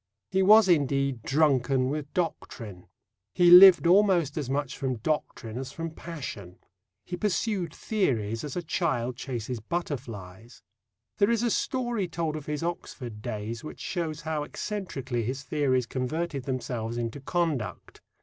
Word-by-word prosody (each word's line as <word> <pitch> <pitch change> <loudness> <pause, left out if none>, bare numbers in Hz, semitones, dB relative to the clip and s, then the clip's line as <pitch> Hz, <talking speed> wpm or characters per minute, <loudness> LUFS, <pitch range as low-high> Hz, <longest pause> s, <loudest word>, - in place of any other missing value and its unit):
He 190 0 +2
was 215 +2 +7
indeed 140 -6 +2
drunken 135 -2 +2
with 150 -1 -4
doctrine. 115 - -4 0.5
He 175 -1 +6
lived 180 -1 +10
almost 180 -5 +4
as 145 -5 -3
much 140 -1 -1
from 130 -2 -2
doctrine 120 -2 -3
as 135 0 -6
from 165 +2 -5
passion. 130 - -8 0.5
He 180 - -4
pursued 195 -2 -1
theories 115 - -1
as 145 -3 -5
a 175 - -2
child 130 -8 -1
chases 120 -1 -4
butterflies. 115 - -6 0.6
There 200 +1 +4
is 235 0 +1
a 240 - +1
story 240 -7 -1
told 165 -2 -2
of 155 -2 -7
his 150 +1 -3
Oxford 125 -10 -5
days 110 +2 -5
which 155 - -8
shows 165 -3 -3
how 155 -1 -2
eccentrically 150 - -4
his 130 +5 -3
theories 130 -4 +1
converted 135 +3 -3
themselves 120 -3 -3
into 120 +3 -3
conduct. 145 - -2
145 Hz, 140 wpm, -27 LUFS, 120-175 Hz, 0.6 s, lived